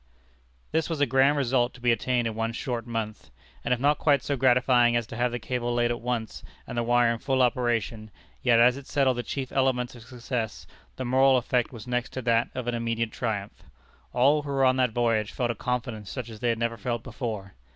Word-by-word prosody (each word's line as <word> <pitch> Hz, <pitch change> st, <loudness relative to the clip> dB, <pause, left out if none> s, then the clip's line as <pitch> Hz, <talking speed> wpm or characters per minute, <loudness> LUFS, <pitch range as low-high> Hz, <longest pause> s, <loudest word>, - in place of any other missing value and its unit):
This 160 Hz, +1 st, 0 dB
was 165 Hz, -3 st, -2 dB
a 145 Hz, -, +4 dB
grand 135 Hz, +3 st, +3 dB
result 125 Hz, -2 st, +1 dB
to -, -, -13 dB
be 120 Hz, -1 st, +2 dB
attained 120 Hz, +1 st, 0 dB
in 115 Hz, -, -1 dB
one 115 Hz, +1 st, -2 dB
short 120 Hz, -2 st, -4 dB
month; 110 Hz, -2 st, -4 dB, 0.3 s
and -, -, -2 dB
if 125 Hz, -, +2 dB
not 145 Hz, +2 st, +2 dB
quite 140 Hz, -3 st, +3 dB
so 140 Hz, -, -1 dB
gratifying 125 Hz, -2 st, +4 dB
as 120 Hz, -1 st, +1 dB
to 115 Hz, -, -9 dB
have 120 Hz, +1 st, 0 dB
the 120 Hz, -, -2 dB
cable 120 Hz, -1 st, -2 dB
laid 120 Hz, 0 st, +2 dB
at 120 Hz, -, -4 dB
once, 120 Hz, -2 st, -3 dB, 0.2 s
and -, -, -7 dB
the 120 Hz, -, +1 dB
wire 120 Hz, 0 st, +3 dB
in 115 Hz, -, -6 dB
full 130 Hz, 0 st, +1 dB
operation, 120 Hz, -3 st, 0 dB, 0.3 s
yet 120 Hz, -2 st, +4 dB
as 125 Hz, +2 st, +5 dB
it 140 Hz, -, -10 dB
settled 135 Hz, -3 st, +2 dB
the -, -, 0 dB
chief 130 Hz, +1 st, -5 dB
elements 130 Hz, -2 st, +1 dB
of 120 Hz, -, -12 dB
success, 120 Hz, -1 st, -5 dB, 0.3 s
the 130 Hz, -, -4 dB
moral 130 Hz, +1 st, +4 dB
effect 125 Hz, 0 st, 0 dB
was 115 Hz, -3 st, -9 dB
next 125 Hz, -1 st, -2 dB
to 130 Hz, -, -4 dB
that 115 Hz, 0 st, +2 dB
of 125 Hz, -2 st, -3 dB
an 120 Hz, -, 0 dB
immediate 115 Hz, -1 st, -1 dB
triumph. 105 Hz, -4 st, -4 dB, 0.5 s
All 140 Hz, +5 st, +3 dB
who 145 Hz, -, -8 dB
were 135 Hz, -1 st, +2 dB
on 130 Hz, 0 st, +3 dB
that 130 Hz, -1 st, +3 dB
voyage 115 Hz, -2 st, 0 dB
felt 120 Hz, -2 st, -1 dB
a -, -, -5 dB
confidence 115 Hz, -3 st, -3 dB
such 125 Hz, -3 st, -5 dB
as 110 Hz, -2 st, -10 dB
they 120 Hz, -, 0 dB
had 115 Hz, -, +1 dB
never 115 Hz, 0 st, -1 dB
felt 120 Hz, +1 st, -3 dB
before. 105 Hz, -7 st, -5 dB
120 Hz, 230 wpm, -26 LUFS, 115-130 Hz, 0.5 s, as